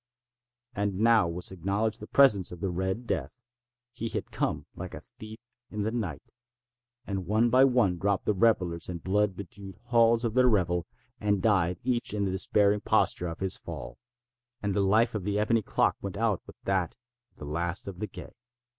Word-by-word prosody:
And 100 -2 -1
now 110 -3 +4
was 85 +2 -3
acknowledged 100 +5 -1
the - - -9
presence 105 -10 +4
of 90 - -8
the 95 0 -2
Red 95 +6 -2
Death. 130 - -3 0.5
He 115 -1 -4
had - - -4
come - - -2
like - - -7
a - - -8
thief 110 0 -12 0.3
in 105 -1 -3
the 110 - -1
night. 100 -11 -4 0.7
And 95 -3 -4
one 110 +4 +2
by 130 +2 +7
one 120 -9 +2
dropped 100 0 0
the 105 - +2
revellers 90 -6 +1
in 90 - -3
the - - -15
blood 100 +1 +1
bedewed 95 0 -9
halls 115 -1 +3
of 115 - -1
their 125 +1 +5
revel, 90 -6 +1 0.3
and 105 -1 +1
died 90 -4 +2
each 120 -3 0
in 100 -1 0
the 95 - -1
despairing 100 +2 +2
posture 90 - +1
of 80 +1 -7
his 95 -1 -1
fall. - - -8 0.6
And 100 -1 -2
the 100 - +1
life 110 +5 +3
of 105 -4 -3
the 100 +1 -1
ebony 110 +2 +2
clock - - +1
went 100 -1 -5
out 110 -4 +1
with - - -12
that 95 -3 0 0.4
of - - -35
the - - -8
last 85 +6 -2
of 95 -3 -7
the 105 - -3
gay. - - -10
100 Hz, 195 wpm, -28 LUFS, 95-110 Hz, 0.7 s, by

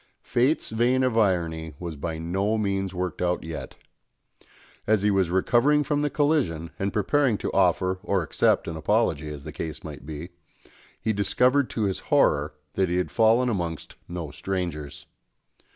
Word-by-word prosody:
Fate's 130 +4 +1
vein 120 +3 +2
of 130 -3 +1
irony 85 -7 0
was 85 -2 -6
by 80 +3 -4
no 95 +7 0
means 95 -2 -1
worked 90 0 -4
out 90 0 0
yet. 80 -1 -7 1.1
As 105 -1 +3
he 105 - +3
was 95 -3 +2
recovering 120 +11 +3
from 145 0 0
the 150 - +1
collision, 135 - 0
and 100 +1 0
preparing 120 +3 +2
to - - -4
offer 95 0 +2
or 95 -3 0
accept - - +2
an 85 - -4
apology, 80 -3 +1
as 75 -2 -8
the - - -7
case 80 -2 -6
might 75 -2 -8
be, 80 +3 -7 0.7
he 110 - 0
discovered 125 +7 +2
to 110 - -2
his 95 -2 0
horror 75 +1 +3 0.2
that 95 -2 +1
he 90 - 0
had 90 - -1
fallen 115 +2 +4
amongst 85 -8 -3
no 85 -4 -5
strangers. 85 -6 -4
95 Hz, 165 wpm, -25 LUFS, 80-115 Hz, 1.1 s, fallen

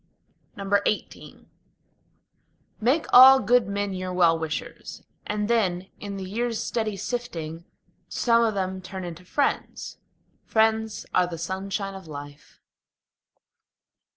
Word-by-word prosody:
XVIII 200 +1 -2 1.4
Make 265 +8 +2
all 265 +2 +10
good 245 +1 +3
men 200 0 -2
your 185 0 -4
well 175 -2 +4
wishers, 160 -1 -6 0.2
and 210 0 -1
then, 190 -6 0
in 200 -1 -6
the 190 - -5
years' 230 +3 -2
steady 215 -3 -2
sifting, 170 -10 -5 0.4
Some 235 -1 +3
of 225 -2 +1
them 190 -1 -2
turn 190 0 -7
into 175 0 -7
friends. 280 +10 -2 0.4
Friends 220 -1 +1
are 180 -1 +3
the 170 -1 -6
sunshine 195 +3 -3
of 190 -3 -10
life. 145 -1 -10
195 Hz, 115 wpm, -25 LUFS, 180-220 Hz, 1.4 s, all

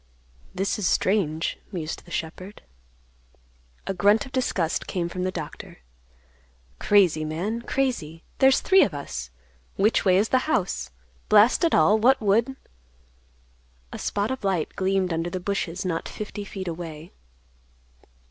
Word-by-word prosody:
"This 195 +3 -1
is 195 - 0
strange," 165 -6 0
mused 160 -5 -5
the - - -15
shepherd. 175 +4 -6 1.2
A - - -2
grunt 205 +7 +3
of 265 - -12
disgust 190 -11 -1
came 175 -2 -2
from 180 +1 -3
the 185 - -1
doctor, 160 -5 -8 1.0
"Crazy, 185 -7 +3
man, 180 +10 -3
crazy. 235 - -2 0.2
There's 265 -1 +5
three 385 0 +5
of 170 - -2
us. 60 - -6 0.5
Which 215 +3 +2
way 185 -2 +4
is 210 +3 +2
the 260 +4 +1
house? 180 - -1 0.4
Blast 215 - +5
it 335 - +3
all, 200 +8 +4
what 255 +5 +4
would—" 225 +5 +1 1.4
A - - -6
spot 205 +3 -1
of 260 - -5
light 190 -5 -1
gleamed 190 -2 0
under 165 +1 -2
the 185 - -4
bushes 185 -2 -3
not 165 -3 -2
fifty 210 -1 -6
feet 190 -2 -7
away. 165 -1 -7
190 Hz, 140 wpm, -25 LUFS, 165-215 Hz, 1.4 s, There's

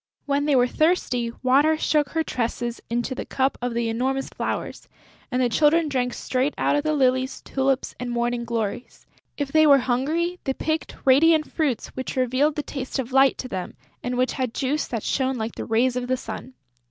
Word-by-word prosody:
When 285 0 0
they 295 -2 +3
were 245 -1 +5
thirsty, 250 -5 +1
Water 285 +5 +4
shook 300 -3 +1
her 325 -1 0
tresses 240 -2 -3
into 240 +3 -1
the - - -4
cup 265 0 0
of 245 -1 -2
the 235 -1 0
enormous 260 +4 -1
flowers; - - -4 0.4
and 250 - 0
the - - +3
Children 305 +5 +3
drank 250 -3 -1
straight 260 +3 -1
out - - +2
of 290 - +2
the 310 0 +1
lilies, 260 -1 +1
tulips 270 0 -1
and 250 0 -4
morning 240 0 -1
glories. 230 0 -4 0.3
If 285 -2 -3
they 310 0 +5
were 280 -1 +8
hungry, 310 +8 0
they 270 - -1
picked 315 0 -2
radiant 305 +4 +5
fruits 280 -8 -1
which 260 - -5
revealed 260 +4 +2
the 295 - -2
taste 270 -2 -5
of 265 -1 -3
Light 270 0 +5
to 255 - -5
them 185 -6 -5 0.3
and 245 0 -3
which 255 +1 +2
had 255 -3 -3
juice 285 +3 -1
that 230 -4 -4
shone 265 -1 0
like 220 0 -3
the - - -6
rays 240 +2 +2
of 250 0 -2
the 255 0 +1
sun. 255 +1 -8
260 Hz, 200 wpm, -24 LUFS, 245-290 Hz, 0.4 s, were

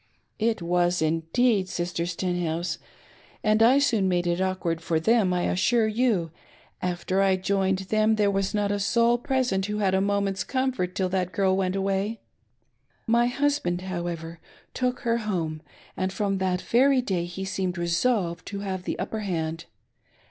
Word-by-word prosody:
"It 220 -4 0
was 175 +1 +1
indeed. 185 +6 +1
Sister 175 -1 -2
Stenhouse, 175 -1 -2 0.6
and 215 0 +3
I 245 +4 +6
soon 225 -9 +2
made 175 -1 +1
it 175 +1 0
awkward 180 -3 -1
for 165 -1 0
them; 215 +1 +3
I 180 -1 0
assure 230 +5 +2
you, 215 -7 +1 0.5
after 180 +2 -1
I 195 -1 +4
joined 190 0 +1
them, 215 +3 +1
there 205 -2 +2
was 195 -1 0
not 205 -1 +1
a 205 - -1
soul 235 +4 +3
present 245 -7 0
who 210 0 -2
had 195 -3 +1
a 190 - +3
moment's 200 -1 0
comfort 255 -9 -1
till 185 -1 0
that 185 -1 -1
girl 190 -1 +2
went 190 -1 0
away. 195 +3 -1 0.9
My 235 +1 +3
husband, 265 -9 0
however, 170 -3 -5 0.3
took 250 -1 -1
her 230 0 +1
home, 170 -8 -3 0.3
and 185 0 -1
from 195 0 -1
that 185 -1 0
very 260 +2 +3
day 180 -7 -1
he 175 +2 -6
seemed 190 -2 -2
resolved 170 +1 0
to 200 -1 -5
have 190 -2 -4
the - - -2
upper 220 - -3
hand. 165 -4 -3
190 Hz, 165 wpm, -26 LUFS, 175-215 Hz, 0.9 s, I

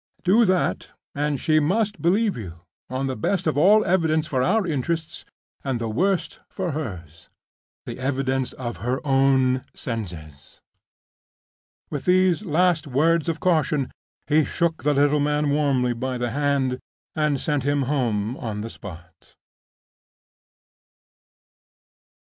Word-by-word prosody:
Do 215 +6 +5
that, 185 -2 0 0.2
and 145 -1 -1
she 155 +3 +3
must 205 +7 0
believe 200 +5 +2
you, 90 -7 -8 0.3
on 130 +1 -2
the 130 -1 -2
best 180 - -1
of 155 - +1
all 200 +8 +5
evidence 160 -4 +2
for 130 -4 -1
our 215 +10 +2
interests, 160 +1 -3 0.4
and 135 -3 -1
the 115 -1 -3
worst 190 - 0
for 185 -3 -3
hers—the 90 - -9
evidence 130 -1 -1
of 120 -3 -5
her 125 +3 -2
own 135 -2 +3
senses." 85 - -7 1.3
With 145 -3 -4
those 185 0 +3
last 175 -3 +1
words 160 +5 +2
of 165 0 -2
caution, 155 -6 +1 0.3
he 155 +1 +3
shook 165 +2 -1
the 150 0 +1
little 145 +1 +3
man 150 0 +1
warmly 135 -4 +1
by 130 +2 -3
the 120 -1 -2
hand 135 -1 0 0.4
and 150 -3 +1
sent 150 0 0
him 145 +1 +1
home 120 -5 -1
on 110 -4 -4
the 115 +1 -6
spot. 85 -3 -12
145 Hz, 130 wpm, -23 LUFS, 125-165 Hz, 1.3 s, Do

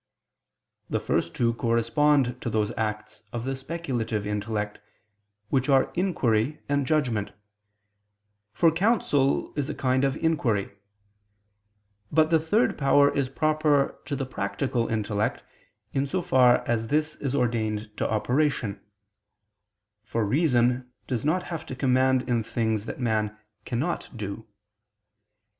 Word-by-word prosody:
The - - 0
first 85 - -1
two 115 -1 +2
correspond 120 +3 +2
to - - -2
those 110 -1 0
acts 105 -1 -4
of 120 0 -4
the 135 0 -2
speculative 130 -8 -3
intellect, 105 0 -3 0.7
which 130 0 +1
are 135 -1 +4
inquiry 145 - +1
and 140 -2 0
judgment, 125 -10 +1 1.2
for 165 +10 +4
counsel 165 - +1
is 145 -2 -2
a - - -3
kind 130 0 +1
of 135 -1 +1
inquiry: 130 -11 0 1.4
but 155 +1 +3
the 165 - +5
third 160 +4 +1 0.3
is 140 -2 0
proper 150 -1 +1
to 140 +1 -2
the 135 - -2
practical 115 +1 -2
intellect, 105 -1 -1 0.5
in 140 0 0
so 185 +7 -1
far 125 -3 +4
as 115 -1 0
this 150 +3 0
is 140 -1 -2
ordained 110 -4 -1
to - - -1
operation; 120 -1 0 1.2
for 115 -1 -1
reason 125 -1 +2
does 120 -4 -2
not 175 +5 +1
have 165 -3 -5
to 130 - -5
command 130 0 +2
in 120 -2 +1
things 110 -1 -1
that - - -6
man 110 -3 0 0.3
cannot 140 +8 -2
do. 110 +1 -6
125 Hz, 125 wpm, -26 LUFS, 110-145 Hz, 1.4 s, the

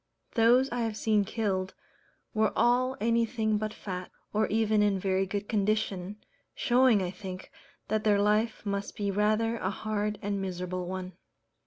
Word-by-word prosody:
Those 240 +3 +5
I 245 - -2
have 225 -2 -1
seen 215 -2 +2
killed, 195 -3 -2 0.6
were 215 -1 +2
all 255 +2 +2
anything 225 -1 +1
but 215 0 -2
fat, 185 -4 -6 0.2
or 215 +1 +2
even 220 -1 +2
in 205 -2 +3
very 190 0 0
good 205 +1 -3
condition, 205 -2 0 0.4
showing, 245 -5 +4
I 180 - -2
think, 185 -1 -8 0.4
that 215 0 0
their 205 -2 +3
life 210 +2 +1
must 200 0 -3
be 200 -1 -1
rather 215 +3 +1
a 190 - -1
hard 210 +1 -2
and 200 -1 -1
miserable 180 -1 -4
one. 185 0 -5
210 Hz, 155 wpm, -29 LUFS, 195-220 Hz, 0.6 s, Those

